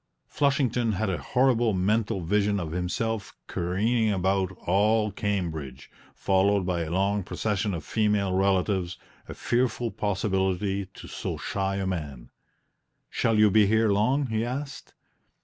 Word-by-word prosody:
Flushington 125 -5 +1
had 100 +1 -1
a 85 - -2
horrible 120 - +2
mental 100 +1 0
vision 100 +3 +1
of 80 -4 -4
himself 100 +5 -3
careering 110 +6 0
about 95 -1 +1
all 105 +3 +2
Cambridge, 80 -10 -4 0.2
followed 95 0 +2
by 90 -2 -1
a 80 - -3
long 100 +4 +1
procession 105 +1 -2
of 75 -3 -7
female 105 -3 +1
relatives 95 -1 +1 0.3
a - - -6
fearful 120 -1 0
possibility 95 -1 -1
to - - -10
so - - -4
shy 95 0 -2
a 100 0 -2
man. 75 -9 -5 0.8
"Shall 115 -2 +1
you 105 -1 +5
be 105 0 +5
here 110 +1 +3
long?" 125 +8 +2
he 110 -2 -1
asked. 135 +3 -6
100 Hz, 135 wpm, -26 LUFS, 95-110 Hz, 0.8 s, you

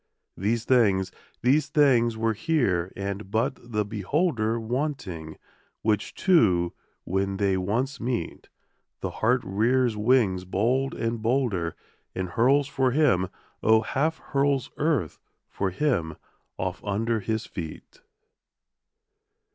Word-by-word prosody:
These 110 +4 -1
things, 100 -7 +3 0.3
these 140 +4 +3
things 130 -7 +3
were 115 0 +1
here 105 - 0
and 100 0 -4
but 115 +6 0
the 105 -1 0
beholder 115 - 0
Wanting; 110 - -4 0.5
which 105 -2 0
two 95 - +3 0.3
when 95 +1 -1
they 100 -1 +2
once 120 +9 -1
meet, 120 -8 -3 0.5
The - - -3
heart 125 +3 +3
rears 115 +4 +1
wings 105 -4 +2
bold 120 +9 0
and 115 0 -2
bolder 115 -8 0 0.4
And 95 -1 -2
hurls 130 +8 +3
for 130 -2 +1
him, 125 - +3 0.3
O 110 0 +5
half 150 +8 0
hurls 140 -2 0
earth 145 - 0 0.3
for 100 - -2
him 90 - 0 0.4
off 95 0 -3
under 110 +3 0
his 110 +1 -2
feet. 80 -4 -8
115 Hz, 115 wpm, -26 LUFS, 95-130 Hz, 0.5 s, O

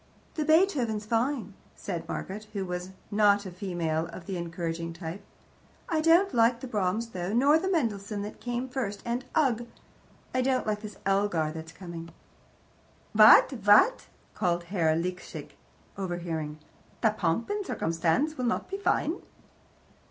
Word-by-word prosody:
"The 310 - -1
Beethoven's 295 - +2
fine," 230 -1 0 0.2
said 170 -4 -5
Margaret, 210 +3 -5
who 195 -2 -2
was 180 0 -4 0.2
not 205 -1 +4
a 185 - -6
female 170 -4 -2
of 170 +1 -10
the 195 - -4
encouraging 170 -1 -4
type. 170 +2 -7 0.7
"I 320 -3 +1
don't 340 +5 +4
like 235 0 +4
the 260 - -6
Brahms, 215 +1 -1
though, 180 -1 -4
nor 280 +6 +5
the 380 +3 -2
Mendelssohn 210 - -1
that 210 - -8
came 245 +1 -2
first 230 -6 -4
and 240 +2 -2
ugh! 240 -6 +2 0.7
I 255 - +2
don't 260 0 +1
like 210 -1 -1
this 210 -2 -8
Elgar 195 -6 +1
that's 160 0 -8
coming." 170 -1 -8 1.0
"What, - - +8
what?" 210 - +5 0.3
called 175 -3 0
Herr 170 -3 +1
Liesecke, 180 +2 -5 0.5
overhearing. 170 -5 -3 0.4
"The 220 - +4
POMP 205 - -1
AND 410 -1 -2
CIRCUMSTANCE 170 - 0
will 250 - 0
not 245 - -1
be 390 - -2
fine?" 355 -3 0
205 Hz, 145 wpm, -28 LUFS, 175-250 Hz, 1.0 s, What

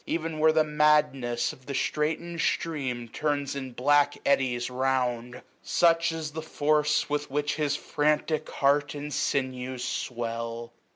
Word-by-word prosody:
Even 165 -1 -2
where 160 +1 +5
the 155 0 +4
madnesa 150 -5 +2
of 130 - -18
the 140 - -4
stiaiten'd 160 +4 -1
stream 135 -7 -1
815 - - -11
Turns 145 +1 -1
in 130 -2 -5
black 145 +3 +3
eddies 125 -3 +2
round; 125 -2 -1 0.2
such 165 -1 +3
is 160 -2 -4
the 160 +2 -5
force 150 -1 +1
With 145 0 -2
which 145 +1 -1
his 145 -2 +1
frantic 150 +1 0
heart 145 +1 +1
and 145 0 -5
sinews 130 -2 -2
swell. 115 -1 -4
145 Hz, 140 wpm, -27 LUFS, 130-150 Hz, 0.2 s, where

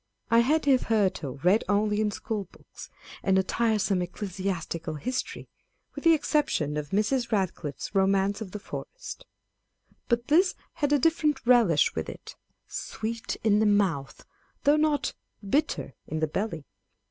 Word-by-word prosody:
I 230 - +6
had 295 +7 +2
hitherto 210 - +2
read 190 +5 +4
only 210 +1 +2
in 215 - +2
school 205 0 -4
books, - - -14 0.3
and 190 -1 +2
a 190 - +3
tiresome 210 -3 +1
ecclesiastical 180 -3 -4
history 255 - -4 0.5
(with - - -8
the 330 -1 +7
exception 285 - 0
of 150 -1 -3
Mrs. 235 - +1
Kadcliffe's 185 - -2
Romance 195 +1 +2
of 210 - -5
the 210 - -6
Forest]: - - -8 0.8
but 235 -1 +1
this 355 +5 +4 0.2
had 290 -2 -1
a 295 - +5
different 300 -2 +1
relish 230 -11 +4
with - - -3
it, - - -10
â€" - - -47
" - - -50 0.2
sweet 230 +2 -4
in 210 -1 +4
the 220 - +3
mouth," 190 -10 0 0.4
though 290 +1 +5
not 305 -1 +1 0.2
" 200 - -15
bitter 295 +3 0
in 155 - -3
the 155 - +2
belly." 165 -1 -3
210 Hz, 155 wpm, -27 LUFS, 190-250 Hz, 0.8 s, the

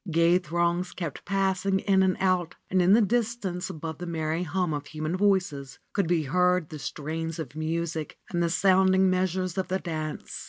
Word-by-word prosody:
Gay 170 +2 +4
throngs 175 +1 -1
kept 165 -6 -5
passing 195 0 +1
in 190 0 +2
and 190 -1 +2
out, 185 -3 +1 0.2
and 185 -1 +3
in 180 +2 +5
the 225 +1 +6
distance 210 -5 -1
above 160 -3 -6
the 175 - -5
merry 160 0 -1
hum 180 0 -1
of 145 -1 -4
human 155 +3 -3
voices 180 -10 0 0.2
could 200 -4 +1
be 170 -2 +2
heard 180 +3 +2
the 155 - -7
strains 160 +4 -4
of 160 -2 -6
music 160 0 -3
and 175 -2 0
the 170 - +2
sounding 190 +1 +4
measures 185 0 0
of 190 - -1
the 190 - 0
dance. 155 -4 -5
175 Hz, 185 wpm, -27 LUFS, 160-190 Hz, 0.2 s, the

